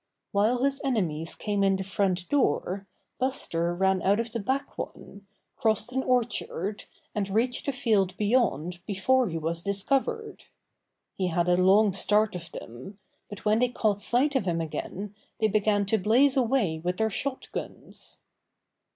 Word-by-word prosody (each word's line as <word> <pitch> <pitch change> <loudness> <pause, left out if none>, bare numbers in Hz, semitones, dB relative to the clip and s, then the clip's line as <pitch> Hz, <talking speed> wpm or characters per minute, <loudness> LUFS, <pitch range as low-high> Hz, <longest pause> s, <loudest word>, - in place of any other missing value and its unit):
While 225 +5 +2
his 275 0 +1
enemies 170 - -1
came 205 -2 -1
in 195 0 +3
the 190 - -3
front 185 -2 -1
door, 195 - 0 0.3
Buster 175 -10 -1
ran 190 0 +2
out 200 +3 +3
of 230 0 -2
the 230 - -2
back 265 +7 -2
one, 200 0 -8 0.3
crossed 220 -1 0
an 265 +1 0
orchard, 230 -6 -1 0.3
and 200 -2 -2
reached 240 +7 0
a - - +2
field 205 -8 +1
beyond 200 - +1
before 230 +4 +2
he 165 - -3
was 165 +1 -2
discovered. 270 - -1 0.7
He 185 - -1
had 175 0 0
a 180 - +4
long 195 +3 +4
start 210 +2 +3
of 170 -2 -7
them, 130 - -9 0.3
but 205 0 -10
when 215 +1 +3
they 250 0 +3
caught 210 -4 0
sight 260 +7 +2
of 250 -7 +1
him 170 -1 0
again 190 +5 -5 0.3
they 220 - +3
began 205 -1 +2
to 220 +2 +1
blaze 250 +8 +4
away 230 -11 +1
with 180 +1 -1
their 220 0 +1
shot 270 +5 -3
guns. - - -5
205 Hz, 160 wpm, -27 LUFS, 185-245 Hz, 0.7 s, a